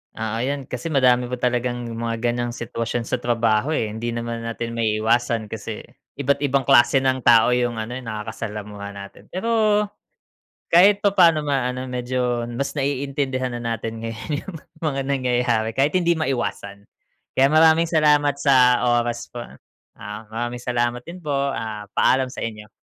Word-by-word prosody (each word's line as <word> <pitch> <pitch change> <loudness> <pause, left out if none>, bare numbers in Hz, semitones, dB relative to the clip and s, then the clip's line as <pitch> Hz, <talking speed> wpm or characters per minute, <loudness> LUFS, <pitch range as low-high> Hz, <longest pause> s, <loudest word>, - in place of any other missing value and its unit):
Oo 110 0 -3
'yan 140 +2 -2
kasi 125 +6 -4
madami 125 -4 +3
pa 125 - -3
talagang 120 0 -1
mga 115 0 -3 0.2
ganong 120 0 -3
sitwasyon 115 0 -3
sa 125 +1 -2
trabaho, 120 +4 +1
eh, 110 -2 -1
hindi 115 +2 -4
naman 115 0 -4
natin 115 0 -4
maiiwasan 110 0 +1
kasi 110 0 -6 0.3
iba't 140 0 0
ibang 140 -1 +1
klase 130 +3 +5
ng 130 0 +1
tao 115 0 +5
yung 120 -1 +1
ano 110 +2 -4
yung 125 -2 -7
nakaka-salamuha 105 -1 -6
natin 100 0 -11
pero, 215 +1 +2 0.9
kahit 195 +4 +6
papaano 180 -6 +5
ma 140 -4 0
ano 130 +1 -5
medyo 125 -1 -1
mas 140 +5 -3
naiintindihan 135 -1 -1
na - - -7
natin 115 0 -5
ngayon 115 +6 -6
yung 190 - -8 0.3
mga 135 -2 0
nangyayari 125 -4 0
kahit 140 +6 +1
hindi 170 -1 +2
maiwasan. 100 - -3 0.5
Kaya 135 +1 +4
maraming 160 +1 +5
salamat 150 -3 +3
sa 125 -3 +5 0.2
oras 120 0 -4
po 120 - -5
a - - -10 0.5
ah, 105 +1 -7
maraming 120 +2 -4
salamat 120 0 -1
din 170 +7 -10
po 150 -5 -4 0.6
paalam 130 0 +3
sa 125 - -5
inyo. 105 -2 -7
125 Hz, 155 wpm, -22 LUFS, 115-140 Hz, 0.9 s, kahit